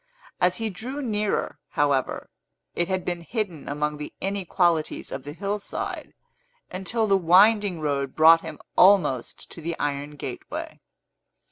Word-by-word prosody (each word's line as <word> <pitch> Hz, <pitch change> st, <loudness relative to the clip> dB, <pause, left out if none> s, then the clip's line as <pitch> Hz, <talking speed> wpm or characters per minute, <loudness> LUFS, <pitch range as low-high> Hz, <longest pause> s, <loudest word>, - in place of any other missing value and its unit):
As 180 Hz, 0 st, +2 dB
he 225 Hz, -1 st, -2 dB
drew 250 Hz, +9 st, -6 dB
nearer, 210 Hz, -, -1 dB
however, 140 Hz, -3 st, 0 dB, 0.4 s
it 175 Hz, -, 0 dB
had 185 Hz, -1 st, -2 dB
been 175 Hz, -1 st, -2 dB
hidden 185 Hz, -, -4 dB
among 150 Hz, +1 st, -2 dB
the 150 Hz, -, -7 dB
inequalities 180 Hz, -4 st, 0 dB
of -, -, -4 dB
the 145 Hz, -, -7 dB
hillside, 200 Hz, +5 st, -4 dB, 0.6 s
until 195 Hz, +5 st, -1 dB
the 200 Hz, -2 st, +3 dB
winding 195 Hz, +1 st, +5 dB
road 140 Hz, -3 st, -2 dB
brought 165 Hz, +1 st, +7 dB
him 160 Hz, -2 st, -7 dB, 0.2 s
almost 180 Hz, -10 st, +3 dB
to 165 Hz, -, -9 dB
the 165 Hz, +1 st, -4 dB
iron 145 Hz, 0 st, -3 dB
gateway. -, -, -6 dB
175 Hz, 135 wpm, -25 LUFS, 150-200 Hz, 0.6 s, brought